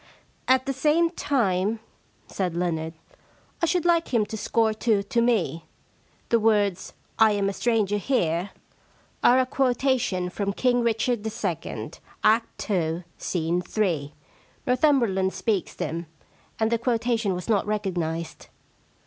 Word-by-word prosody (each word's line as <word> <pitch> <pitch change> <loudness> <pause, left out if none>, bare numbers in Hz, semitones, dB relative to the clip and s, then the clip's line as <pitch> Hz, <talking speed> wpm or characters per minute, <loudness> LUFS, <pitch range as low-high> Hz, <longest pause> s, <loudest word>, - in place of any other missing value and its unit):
* - - -37
At 260 0 -4
the 275 - -1
same 310 +5 +2
time,' 220 - 0 0.5
said 180 -3 -3
Leonard, 165 -2 -2 0.3
* - - -34
I 335 - +3
should 355 0 +1
like 335 -1 +2
him 230 -4 +2
to 220 - -6
score 220 +1 +1
two 215 -2 +1
to 235 +4 0
me. 175 - +1 0.6
The 230 - +4
words, 205 -4 +1 0.3
I 220 -1 +6
am 200 -1 0
a 195 - -1
stranger 215 -3 +1
here," 185 -6 0 0.7
are 250 - +6
a 260 - +3
quotation 250 -8 0
from 200 +1 -2
King 245 +2 +2
Richard 235 +1 +1
II., 180 - -4 0.3
Act 225 +2 +2
2, 170 -3 -1 0.2
Scene 175 0 -1 0.2
iii. 155 -8 0 0.5
Northum 270 +3 +4
berland 190 -4 0
speaks 195 0 -1
them. 165 +2 -4 0.5
And 220 0 +1
the 235 - +2
quotation 230 -4 0
was 180 - -6
not 210 -3 +1
recognised.' 175 -6 -3
215 Hz, 140 wpm, -25 LUFS, 180-240 Hz, 0.7 s, I